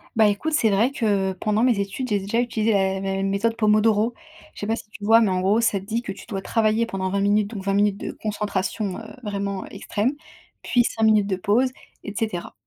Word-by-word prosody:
Bah, 220 -1 +5
écoute, 255 +10 -1
c'est 225 -7 +3
vrai 225 +7 +3
que 200 -6 0
pendant 210 +4 0
mes 240 -5 +3
études, 215 +6 -3
j'ai 205 -1 +1
déjà 205 +5 -1
utilisé 225 -2 0
la 190 -1 +1
la 195 0 -2
méthode 200 +4 0
Pomodoro. 215 +1 +3 0.4
Je - - -10
sais 205 - -3
pas 225 - +1
si 210 - -10
tu 210 - -12
vois? 225 +2 +6
Mais 210 - +3
en 185 0 0
gros, 205 +5 +3
ça 210 -4 +1
te 190 - -12
dit 225 +3 -2
que 210 - -5
tu 195 - -10
dois 195 -4 -4
travailler 220 +2 +1
pendant 190 -2 -3
20 200 +1 0
minutes, 205 0 +2
donc 200 -4 -6
20 195 0 0
minutes 205 -1 +2
de - - -5
concentration, 205 -1 -3
heu, - - -9 0.2
vraiment 200 -2 -3
extrême, 210 +6 -2 0.5
puis 245 - +3
5 225 -1 -2
minutes 215 -2 +4
de 190 - 0
pause, 220 +8 +2 0.3
et 205 - -6
cetera. 215 -6 -3
210 Hz, 230 wpm, -23 LUFS, 195-225 Hz, 0.5 s, vois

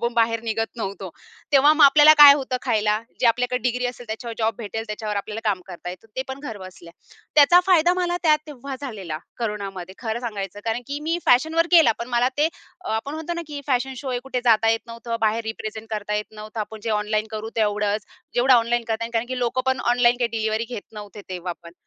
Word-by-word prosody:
आपण 235 0 -1
बाहेर 230 -1 +2
निघत 225 0 -1
नव्हतो. 195 -4 -5 0.4
तेव्हा 285 +2 +6
मग 310 -1 +6
आपल्याला 295 +2 +8
काय 280 - +11
होतं 270 -3 -2
खायला? 215 -3 +1 0.2
जे - - +4
आपल्याकडे 250 +2 +1
डिग्री 250 +1 -1
असेल 245 0 -7
त्याच्यावर 230 +1 -6
जॉब 225 0 +1
भेटेल, 225 0 -5
त्याच्यावर 210 0 -4
आपल्याला 210 +2 -4
काम 190 -3 -2
करता 180 -1 -7
येतं. 185 +4 -11
ते 260 - 0
पण 265 +1 -6
घरबसल्या. 185 - -9 0.4
त्याचा 310 +4 +7
फायदा 350 -2 +5
मला 355 -1 -1
त्या 315 -3 +5
तेव्हा 275 -2 -7
झालेला 200 - -6 0.2
कोरोनामध्ये 195 -5 -5
खरं 230 -1 -3
सांगायचं, 205 -4 -5
कारण 225 +1 -1
की 285 +1 -4
मी 325 +3 -1
फॅशनवर 320 +6 +3
केला, 325 -9 +6
पण 235 - -5
मला 245 0 +2
ते 305 +2 +4 0.3
आपण 280 -3 -3
म्हणतो 320 +2 -4
ना 340 - -4
की 290 -1 -6
फॅशन 265 0 0
शो 265 +1 -5
हे 250 - -1
कुठे 255 -2 -3
जाता 225 -2 +4
येत 225 0 +1
नव्हतं. 230 0 -5
बाहेर 220 +1 +1
रिप्रेझेंट 220 0 -6
करता 210 -1 -3
येत 210 0 -1
नव्हतं. 215 +1 -7
आपण 215 +1 -6
जे 230 - -2
ऑनलाईन 215 0 0
करू 220 0 -5
तेवढंच. 210 -1 0 0.3
जेवढं 255 +2 +5
ऑनलाईन 240 0 +2
करता 225 0 -1
येईल, 230 - -6
कारण 230 +1 0
की 255 0 -3
लोकं 245 +1 0
पण 260 -1 +1
ऑनलाईन 245 0 +4
काही 240 -2 +1
डिलिव्हरी 220 +1 -1
घेत 240 -5 -6
नव्हते 210 -1 -9
तेव्हा 180 -1 -4
पण. 170 - -12
230 Hz, 215 wpm, -23 LUFS, 215-260 Hz, 0.4 s, काय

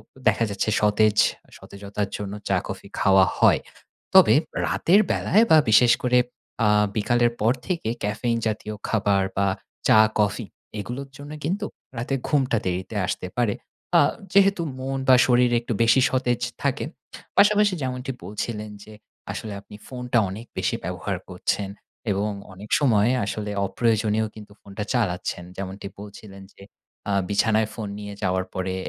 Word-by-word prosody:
অ - - -19
দেখা 110 +2 +3
যাচ্ছে 100 +2 -1
সতেজ 105 0 +3 0.3
আ - - -24
সতেজতার 100 0 -5
জন্য 100 -1 -5
চা, 95 - +2
কফি 95 +1 -7
খাওয়া 95 -1 +5
হয়। - - +5 0.5
তবে 190 -1 +8 0.3
রাতের 195 +5 +3
বেলায় 215 +5 +3
বা 160 - +9
বিশেষ 115 +2 +6
করে 125 0 +4 0.5
আ - - +4 0.3
বিকালের 120 +2 +2
পর 115 +3 +4
থেকে 170 - -2
ক্যাফেইন 115 +3 -1
জাতীয় 110 0 -3
খাবার 100 -3 +2
বা 100 - +2 0.4
চা, 110 - +6 0.2
কফি 105 +2 +1 0.3
এগুলোর 130 +6 -6
জন্য 145 +1 -10
কিন্তু 195 +7 -1 0.3
রাতে 125 +4 -1
ঘুমটা 135 -5 +2
দেরিতে 95 +4 -3
আসতে 90 - -3
পারে, 120 -4 +2 0.4
আ - - +7 0.3
যেহেতু 195 -2 +4 0.2
মন 135 +1 -3
বা 130 - +9
শরীর 125 -1 +3
একটু 120 0 -4
বেশি 115 +4 +5
সতেজ 125 -2 0 0.2
থাকে। 140 0 0 0.5
পাশাপাশি 205 -1 +5
যেমনটি 130 +1 -3
বলছিলেন 105 +1 -4
যে, 110 - -13 0.4
আসলে 110 -2 -6
আপনি 105 - -13
ফোনটা 125 -1 -2
অনেক 105 +5 -7
বেশি - - 0
ব্যবহার - - -3
করছেন 100 -1 -2 0.4
এবং 105 +2 0 0.2
অনেক 100 +3 -11
সময় 115 -6 +3 0.2
আসলে 105 +1 -4
অপ্রয়োজনেও 110 0 +1
কিন্তু 105 -1 -12
ফোনটা 100 +1 -6
চালাচ্ছেন। 90 -6 -1
যেমনটি 95 +1 -6
বলছিলেন 100 -1 -11
যে, - - -15 0.5
আ - - +1 0.2
বিছানায় 110 +1 +2
ফোন 110 -3 -5
নিয়ে 105 0 -7
যাওয়ার 95 -1 0
পরে 95 0 -2
110 Hz, 150 wpm, -24 LUFS, 100-125 Hz, 0.5 s, বা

